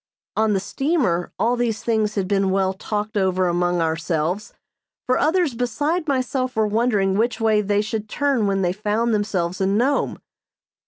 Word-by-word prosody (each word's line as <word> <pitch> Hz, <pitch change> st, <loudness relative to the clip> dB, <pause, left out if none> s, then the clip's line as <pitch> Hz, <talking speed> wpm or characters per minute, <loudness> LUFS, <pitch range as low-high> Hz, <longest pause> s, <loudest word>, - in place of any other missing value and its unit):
On 220 Hz, -1 st, +2 dB
the 195 Hz, -, +2 dB
steamer 225 Hz, -, 0 dB
all 230 Hz, +5 st, +2 dB
these 235 Hz, -3 st, -1 dB
things 220 Hz, -2 st, 0 dB
had 195 Hz, -3 st, -1 dB
been 195 Hz, -1 st, +1 dB
well 190 Hz, 0 st, +1 dB
talked 210 Hz, +2 st, -4 dB
over 185 Hz, -2 st, +1 dB
among 175 Hz, 0 st, +1 dB
ourselves, 165 Hz, +3 st, -1 dB, 0.5 s
for 255 Hz, -, +2 dB
others 320 Hz, -2 st, +2 dB
besides 290 Hz, +8 st, -1 dB
myself 255 Hz, -1 st, -1 dB
were 220 Hz, -1 st, +2 dB
wondering 210 Hz, -3 st, +1 dB
which 240 Hz, +3 st, 0 dB
way 220 Hz, -2 st, +3 dB
they 205 Hz, 0 st, +1 dB
should 215 Hz, 0 st, -4 dB
turn 275 Hz, -6 st, +1 dB
when 195 Hz, -1 st, 0 dB
they 175 Hz, 0 st, +1 dB
found 215 Hz, +3 st, 0 dB
themselves 190 Hz, -4 st, -1 dB
in 195 Hz, +2 st, +2 dB
Nome. 270 Hz, +5 st, +1 dB
210 Hz, 165 wpm, -22 LUFS, 190-240 Hz, 0.5 s, way